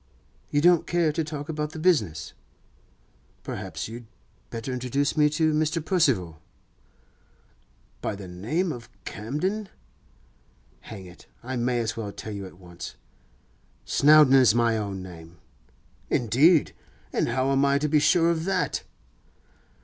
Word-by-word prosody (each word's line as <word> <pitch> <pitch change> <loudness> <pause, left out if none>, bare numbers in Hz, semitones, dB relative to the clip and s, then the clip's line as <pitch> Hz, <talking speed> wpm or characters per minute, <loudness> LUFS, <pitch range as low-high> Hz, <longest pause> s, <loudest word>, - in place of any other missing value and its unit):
'You 145 - +1
don't 175 0 +4
care 170 -2 +2
to 160 +2 -1
talk 150 -1 -6
about 150 -1 -3
the - - -7
business? 110 - +1 1.1
Perhaps - - -5
you'd 115 +1 -9 0.4
better 115 +3 -5
introduce 130 +3 -1
me 150 -1 +4
to 155 +1 +1
Mr. 155 +1 0
Percival.' 105 - +1 1.6
'By - - -2
the 100 -1 -9
name 120 - -2
of 120 -4 -8 0.2
Camden?' 165 - -3 1.1
'Hang 100 -4 -10
it! 90 0 -15 0.2
I 130 +2 -4
may 120 0 0
as 110 -2 -2
well 105 -3 -5
tell 110 +1 -7
you 100 -1 -6
at 90 - -15
once. 85 -7 -10 0.9
Snowdon 150 -2 +6
is 130 -5 +6
my 115 -1 +3
own 100 -3 -4
name.' 85 -2 -12 0.7
'Indeed? 140 +8 +3 0.4
And - - +1
how 130 +3 +1
am 135 0 +3
I 140 0 +3
to 150 +2 0
be 150 0 +3
sure 165 +3 +4
of 165 -1 -2
that? 190 -1 0
135 Hz, 140 wpm, -26 LUFS, 105-155 Hz, 1.6 s, Snowdon